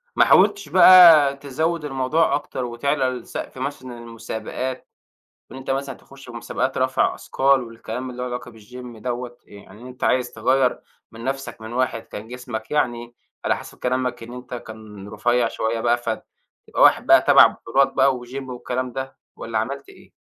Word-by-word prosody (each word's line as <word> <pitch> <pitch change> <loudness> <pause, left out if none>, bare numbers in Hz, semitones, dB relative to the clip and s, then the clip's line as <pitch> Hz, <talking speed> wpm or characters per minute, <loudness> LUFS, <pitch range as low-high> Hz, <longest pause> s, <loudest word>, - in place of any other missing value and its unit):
ما - - +5
حاولتش 200 -4 +4
بقى 165 -5 +8
تزود 155 +4 -2
الموضوع 140 +3 +1
أكتر 130 -3 -4
وتعلى 135 +4 -1
لسقف 125 -2 -7
مثلًا 125 -2 -6
المسابقات، 115 +2 -6 0.7
إن - - -9
أنت 135 0 -7
مثلًا 135 0 -2
تخش 135 +2 -17
في - - -10
مسابقات 115 - -3
رفع 130 0 +1
أثقال 135 0 +1
والكلام 115 +2 -7
اللي 125 0 -7
له 125 - -3
علاقة 125 0 -6
بالجيم 120 +2 -12
دوّة، 120 +1 -5
يعني 100 +1 -15
أنت 125 0 -7
عايز 125 -1 +1
تغيّر 130 +3 +1 0.3
من 115 +1 -10
نفسك 135 -2 -4
من 110 +1 -8
واحد 125 -2 -1
كان 105 +2 -10
جسمك 120 -3 -7
يعني 120 -5 -1 0.3
على - - +1
حسب - - -12
كلامك 125 -1 -2
إن 115 +1 -9
أنت 125 0 -9
كان 110 -4 -10
رفيّع 120 +3 +1
شوية 115 0 -2
بقى 120 +1 +2
فتبقى 115 -2 -5
واحد - - +5
بقى - - +6
تبع - - +7
بطولات 135 +4 0
بقى 135 -1 +3
وجيم 130 +2 -8
والكلام 125 0 -4
ده، 130 +1 -6 0.2
والّا 115 -1 -3
عملت 135 +5 -4
إيه؟ - - -17
125 Hz, 165 wpm, -22 LUFS, 115-135 Hz, 0.7 s, بقى